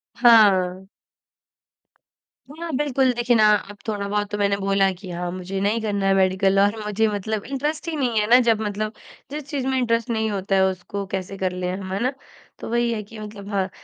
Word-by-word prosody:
हाँ। 190 -6 +5 1.6
हाँ 330 +2 -6
बिल्कुल। 270 -3 +2
देखिए 240 0 +1
ना 215 -1 +5 0.3
अब 205 - -14
थोड़ा 205 -2 -2
बहुत 205 0 -1
तो 210 - -2
मैंने 200 -1 +1
बोला 195 0 +2
कि 190 0 -10
हाँ 175 0 -3
मुझे 185 +1 -5
नहीं 210 +3 +1
करना 205 -2 -1
है 195 - +4
मेडिकल 190 +1 +3
और 205 +2 +3
मुझे 210 +1 +1
मतलब 210 0 -3
इंटरेस्ट 295 +5 -3
ही 325 - -3
नहीं 245 -6 0
है 210 - 0
ना, 245 +2 +8
जब 230 -3 +3
मतलब 215 +1 -3 0.4
जिस 300 +1 -5
चीज़ 280 -3 -2
में 265 0 +1
इंटरेस्ट 230 -2 0
नहीं 220 -1 0
होता 195 0 -1
है 190 - +4
उसको 190 +2 -3
कैसे 195 0 -4
कर 185 -1 -1
लें 180 0 -3
हम, 190 -1 -7
है 195 - -1
ना? 255 +2 0 0.5
तो - - -7
वही 235 0 +1
है 215 - -3
कि 215 +2 -12
मतलब 210 -1 -9
हाँ, 195 -2 -1
210 Hz, 210 wpm, -23 LUFS, 195-235 Hz, 1.6 s, ना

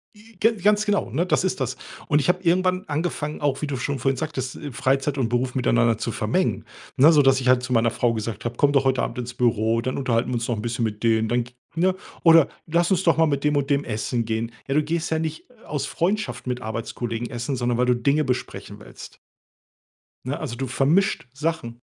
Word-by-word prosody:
J 215 -1 -19
ga 225 +2 +4
ganz 210 +1 +2
genau, 205 - 0
ne, 165 +8 0
das 185 - +1
ist 185 - -1
das. 130 -1 -2 0.3
Und 150 - +3
ich 175 - -1
habe 180 +1 +2
irgendwann 185 +2 +2
angefangen, 150 -1 -3
auch 145 -1 0
wie 150 - -2
du 140 - -3
schon 135 +2 -3
vorhin 135 +2 +1
sagtest, 135 -5 -4
äh, 145 -3 -7
Freizeit 135 +3 0
und 125 -4 +1
Beruf 125 +2 -1
miteinander 115 -3 +2
zu - - -3
vermengen, - - 0 0.3
ne? 150 +5 +7
Sodass 135 -3 +4
ich 125 - +1
halt 125 0 +4
zu 125 0 -2
meiner 115 0 +3
Frau 120 -1 +1
gesagt 110 0 -5
habe: 120 0 -3
„Komm 145 0 +4
doch 135 -1 +2
heute 130 -1 +2
Abend - - -4
ins 125 0 -5
Büro, 115 -1 +1
dann 130 +2 -3
unterhalten 125 -3 0
wir 125 - -1
uns 115 0 -2
noch 120 - 0
'n 105 - -5
bisschen 120 0 -2
mit 105 +1 -5
denen, 110 -1 +3
dann“ 120 +1 +1 0.3
ne? 185 +2 +2 0.3
Oder: 165 -3 +7 0.2
„Lass 170 +3 +1
uns 190 0 +2
doch 165 -2 +3
mal 165 - +5
mit 140 -2 -1
dem 150 -1 +2
und 140 0 -1
dem 140 0 +2
essen 115 +1 -2
gehen.“ 115 +1 -3 0.2
Ja, 135 - 0
du 150 - +3
gehst 165 +2 -2
ja 160 - +1
nicht 160 +5 -5 0.2
aus 145 -1 -2
Freundschaft 205 -4 -2
mit 125 -1 -2
Arbeitskollegen 115 +1 -4
essen, 120 +2 -3
sondern 120 -1 0
weil 125 - +2
du 125 0 +3
Dinge 140 +5 +2
besprechen 130 -2 -4
willst. - - -12 1.1
Ne, - - -3
also, 120 - -4
du 135 +2 -3
vermischt 140 +4 +1
Sachen. 135 -6 -3
135 Hz, 230 wpm, -23 LUFS, 120-160 Hz, 1.1 s, ne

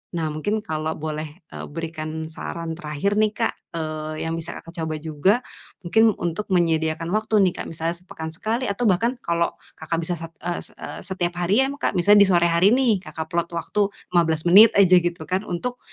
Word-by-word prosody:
Nah 160 -2 -1
mungkin 205 +9 -1
kalau 155 -2 -2
boleh, 155 0 -4 0.2
eee, - - -7
berikan 160 0 -5
saran 165 +1 -5
terakhir 165 +6 -1
nih 215 -1 +3
Kak, 230 - 0 0.2
eee, 155 -1 -4
yang 165 - -2
bisa 165 +1 -5
Kakak 165 - -10
coba 160 -1 -2
juga, 155 +6 +1 0.5
mungkin 220 +6 +4
untuk 175 +5 -2
menyediakan 165 -2 +1
waktu 215 0 +1
nih 180 -2 +2
Kak. - - -3
Misalnya 165 +1 -2
sepekan 160 -3 -7
sekali, 220 +9 -2
atau 225 +4 0
bahkan 230 +6 +1
kalau 170 -3 0 0.2
Kakak 160 +1 -3
bisa 175 +2 -2
sat 165 0 -8
e 175 - -3
set - - -14
e - - -6 0.2
setiap 180 -2 -2
hari 180 +5 +2
ya 265 - +2
ma 280 - -5
Kak, - - 0
misalnya 205 +3 +6
di - - +2
sore 170 -1 +4
hari 170 +4 +4
nih, 235 -6 +3
Kakak 160 -1 -6
plot 170 0 -1
waktu 170 +5 0 0.3
15 160 -2 +3
menit 205 +6 +9
aja, 185 -2 +7
gitu 175 -1 0
kan. 185 +3 -1
Untuk, 245 +8 -3
170 Hz, 200 wpm, -23 LUFS, 160-200 Hz, 0.5 s, menit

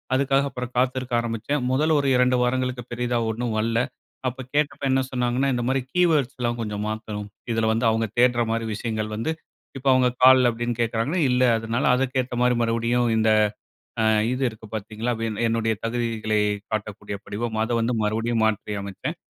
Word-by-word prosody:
அதுக்காக 135 -2 0
காத்திருக்க 130 -1 0
ஆரம்பிச்சேன். 115 +5 -2
மொதல்ல 155 +4 +2
ஒரு 140 - 0
2 125 0 +3
வாரங்களுக்கு 125 0 -1
பெரிதா 120 0 -1
ஒண்ணும் 115 0 -2
வர்ல. 115 +1 0 0.5
அப்ப 130 +1 -4
கேட்டப்ப 145 -1 0
என்ன 135 0 +3
சொன்னாங்கன்னா, 125 +1 0
இந்த 120 -1 -1
மாரி 135 +1 +2
கீவேர்ட்ஸ் 155 -8 +2
எல்லாம் 120 -1 -1
கொஞ்சம் 105 -1 -3
மாத்தணும். 105 -1 -5 0.2
இதில 115 -1 +1
வந்து 115 +1 0
அவங்க 110 0 0
தேட்ற 120 -1 +4
மாதிரி 115 0 -1
விஷயங்கள் 110 -1 -3
வந்து, 115 +9 -1 0.5
இப்போ 135 +1 -5
அவங்க 130 -1 +4 0.2
கால் 130 -1 +8
அப்படின்னு 120 +1 -2
கேட்டாங்கன்னா, 115 +9 0
இல்ல. 125 +1 +3
அதனால 115 +3 -2
அதற்கேத்தா 130 -1 -1
மாரி 125 0 +3
மறுபடியும் 115 +1 +1
இந்த 110 0 +3 0.7
ஆ - - +2 0.3
இது 130 +1 -1
இருக்கு 110 0 -13
பாத்தீங்களா, 110 +3 -3
அப்படீன்னு 115 0 -3
என்னுடைய 115 0 +1
தகுதிகளை 115 -2 -1 0.3
காட்டக்கூடிய 105 -1 -4
படிவம்மா, 110 +1 -3
அதை 120 - -2
வந்து 115 +2 0
மறுபடியும் 115 +2 0
மாற்றியமச்சேன். 105 - -3
120 Hz, 160 wpm, -24 LUFS, 110-130 Hz, 0.7 s, கால்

